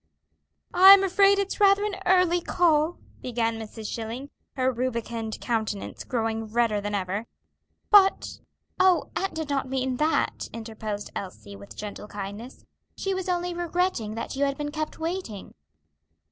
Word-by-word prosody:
"I'm 385 +2 +9
afraid 395 +1 +4
it's 400 +2 -2
rather 400 0 +5
an 420 -2 -2
early 360 -1 +4
call," 330 -2 +2 0.2
began 230 -2 -1
Mrs. 220 0 -8
Schilling, 235 +6 -5 0.2
her 260 -1 +1
rubicund 235 -3 -3
countenance 220 -4 -3
growing 225 -2 -2
redder 220 -2 +1
than 205 0 -3
ever, 200 +3 -3 0.6
"but 395 -2 +5 0.2
" - - -42
"Oh, 370 -1 +3
aunt 390 - -2
did 315 -2 -4
not 275 -2 -1
mean 260 -1 -1
that," 310 +3 0
interposed 220 -2 -6
Elsie, 185 - -7
with 100 +1 -12
gentle 210 0 -7
kindliness. 205 +5 -8 0.3
"She 390 - -1
was 375 -1 -3
only 355 0 -1
regretting 345 - -1
that 230 - -5
you 275 - 0
had 275 -1 -2
been 295 0 -4
kept 310 0 -4
waiting." 325 - -5
260 Hz, 145 wpm, -26 LUFS, 220-355 Hz, 0.6 s, I'm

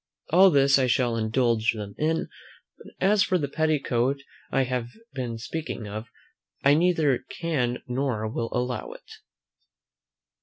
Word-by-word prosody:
All 190 +4 +7
this 140 -3 +4
I 130 - +2
shall 120 -1 +1
indulge 115 0 +1
them 105 -2 -7
in; 160 +1 0 0.5
but - - -14
as 200 +2 +3
for 190 -3 +2
the 145 -4 -2
petticoat 140 -4 0 0.3
I 135 - +2
have 125 -2 -2 0.3
been 120 -3 -4
speaking 120 -2 -5
of, 110 +3 -6 0.6
I 140 - +6
neither 160 -5 +3
can 135 -8 -2
nor 125 -4 -1
will 115 +1 -3
allow 125 -2 -2
it. - - -16
130 Hz, 140 wpm, -26 LUFS, 115-155 Hz, 0.6 s, All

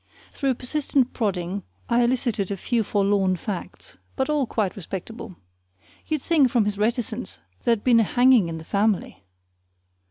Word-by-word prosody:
Through 270 -3 0
persistent 265 0 0
prodding 195 -3 -2 0.3
I 240 0 +3
elicited 235 -5 0
a 200 - -3
few 230 +4 0
forlorn 200 -2 +2
facts, 185 +1 -7 0.2
but 265 +2 0
all 290 -4 +1
quite 210 -5 -1
respectable. 195 +2 -7 0.7
You'd 310 -3 -1
think, 300 -6 +4
from 230 -3 +2
his 205 -1 -2
reticence, 225 - -2 0.3
there'd 230 -3 +2
been 240 -2 +5
a - - +5
hanging 245 -4 +4
in 165 - -4
the 160 - -8
family. 200 - 0
225 Hz, 150 wpm, -24 LUFS, 200-250 Hz, 0.7 s, been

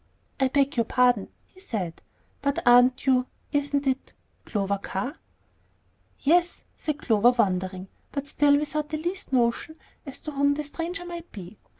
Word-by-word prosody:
"I 265 - +4
beg 275 0 +1
your 230 - +3
pardon," 245 -4 +3 0.2
he 375 - -21
said; 195 - -4 0.4
"but 280 0 0
aren't 245 +2 +6
you 255 -1 +3 0.2
isn't 285 0 0
it 265 0 -1 0.3
Clover 200 -1 -1
Carr?" 200 - -4 1.0
"Yes," 345 +4 +2
said 305 -2 -3
Clover, 225 -5 +4
wondering, 190 -5 0 0.2
but 280 -1 -3
still 285 0 +3
without 300 0 -2
the 310 - -2
least 350 +2 -4
notion 245 +4 +1 0.3
as 275 - -8
to 305 - -5
whom 285 0 +2
the 300 - -3
stranger 335 +4 -5
might 345 -1 -8
be. 195 0 -10
275 Hz, 155 wpm, -26 LUFS, 235-300 Hz, 1.0 s, aren't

